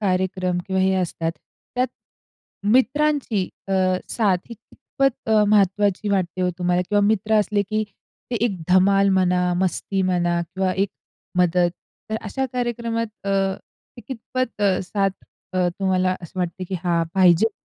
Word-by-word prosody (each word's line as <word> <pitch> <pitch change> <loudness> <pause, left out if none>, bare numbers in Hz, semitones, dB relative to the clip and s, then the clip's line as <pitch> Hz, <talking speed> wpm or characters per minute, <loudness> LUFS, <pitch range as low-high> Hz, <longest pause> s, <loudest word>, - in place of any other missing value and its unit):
कार्यक्रम 185 -2 0
किंवा 190 -1 0
हे 190 - +3
असतात. 165 -2 -1 0.4
त्यात 250 0 +1 0.8
मित्रांची 265 -6 +2 0.2
अ, 195 - -1 0.4
साथ 205 -5 +2
ही 235 - -7
कितपत 265 +3 -3
अ, 215 -1 +5
महत्वाची 205 0 +2
वाटते 185 -2 0
हो 180 - +2
तुम्हाला? 180 0 +1
किंवा 205 - +4
मित्र 215 0 +1
असले, 205 0 +1
की 215 +2 -1 0.5
ते 240 - 0
एक 195 -7 -1
धमाल 195 +2 +5
म्हणा 180 -1 +2
मस्ती 190 +1 -1
म्हणा 175 -2 +1
किंवा 185 +2 -2
एक 195 +2 0 0.5
मदत, 175 0 +3 0.4
तर 220 - 0
अशा 265 +6 -2
कार्यक्रमात 235 -2 -1 0.2
अ, - - 0 0.7
ते - - -9
कितपत 255 -2 -4
अ, 195 -2 +3
साथ 195 +1 0 0.4
अ, 180 -1 +2
तुम्हाला 185 -1 +1
असं 170 +2 -9
वाटते, 180 +1 -3
की 185 - -5
हा 170 -1 +2
पाहिजे? 185 +3 +5
195 Hz, 145 wpm, -22 LUFS, 180-220 Hz, 0.8 s, अ